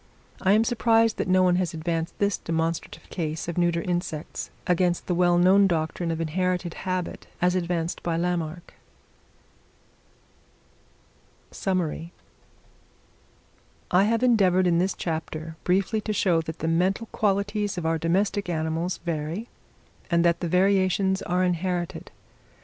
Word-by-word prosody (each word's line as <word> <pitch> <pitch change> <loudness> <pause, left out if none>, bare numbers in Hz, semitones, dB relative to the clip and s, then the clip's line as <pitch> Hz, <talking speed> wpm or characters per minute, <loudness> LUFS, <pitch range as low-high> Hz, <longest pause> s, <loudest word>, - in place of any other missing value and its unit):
I 190 +1 +4
am 215 +2 +5
surprised 230 -1 +2
that - - -1
no 185 0 +4
one 180 -1 +3
has 180 -2 -1
advanced 165 +1 -3
this 200 -1 0
demonstrative 165 0 -3
case 160 -2 -3
of 170 - -3
neuter 175 -1 +1
insects, 175 -3 -3 0.2
against 180 0 +1
the 180 - -1
well 175 0 +3
known 190 +3 +5
doctrine 165 0 -1
of 165 -1 -2
inherited 180 +1 -1 0.2
habit, 185 -1 -3
as 180 0 +2
advanced 170 -2 -2
by 165 -1 -1
Lamarck. 170 -1 -3 2.8
Summary. 175 -3 -2 1.8
I 185 +3 +5
have 230 +2 +1
endeavoured 190 -7 +4
in 170 -1 +3
this 185 +2 0
chapter 160 -1 -4
briefly 195 +4 +1
to 215 - -2
show 175 -5 +2
that 160 0 -7
the 160 - -3
mental 185 +7 +1
qualities 205 0 0
of 175 - -3
our 165 0 +1
domestic 195 +4 0
animals 165 +2 -1
vary, 170 +7 -3 0.6
and 170 -1 +3
that 170 0 +3
the 175 - -2
variations 190 +1 +2
are 180 +1 0
inherited. 180 -1 -2
180 Hz, 135 wpm, -25 LUFS, 165-190 Hz, 2.8 s, am